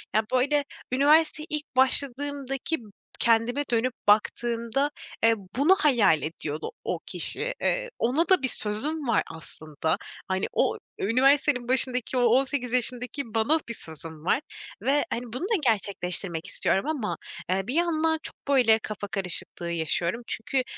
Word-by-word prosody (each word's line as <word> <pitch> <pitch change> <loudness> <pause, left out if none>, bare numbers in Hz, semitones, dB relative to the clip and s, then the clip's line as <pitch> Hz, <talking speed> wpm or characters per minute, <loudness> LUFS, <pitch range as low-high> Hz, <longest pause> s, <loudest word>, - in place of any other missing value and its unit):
ya, 220 - +4
böyle, 280 +3 +2 0.3
üniversiteye 305 +3 +4
ilk 300 -3 -4
başladığımdaki 275 +2 +1
b - - -14 0.3
kendime 235 +5 +2
dönüp 235 +2 +1
baktığımda, 235 +5 +1 0.3
eee, 225 0 +5 0.2
bunu 295 +9 +5
hayal 235 - +4
ediyordu 155 - -4
o - - -2
kişi. - - -2
Eee, - - 0
ona 285 +9 +1
da 375 -7 +5
bir - - +3
sözüm 265 +7 -1
var 230 - +3
aslında. 155 0 -4 0.3
Hani, 190 0 0
o - - +1 0.2
üniversitenin 255 +3 +3
başındaki, 255 -1 +3
o - - +3
18 250 +1 +2
yaşındaki 250 +2 0
bana 265 +9 +3
bir 235 - -3
sözüm 160 -3 -8
var 265 - +2 0.4
ve 285 +2 +2
hani, 235 - -2
bunu 255 - -4
da 440 +4 +1
gerçekleştirmek 190 -6 0
istiyorum 195 - +1
ama, 285 -9 -2 0.3
eee, 190 +2 0
bir 250 - -2
yandan 325 -1 +1
çok, - - -7
böyle, 245 -6 +5
kafa 210 -2 -5
karışıklığı 180 -3 -3
yaşıyorum. 170 +5 -1
Çünkü 255 +4 -1
245 Hz, 140 wpm, -26 LUFS, 210-285 Hz, 0.4 s, eee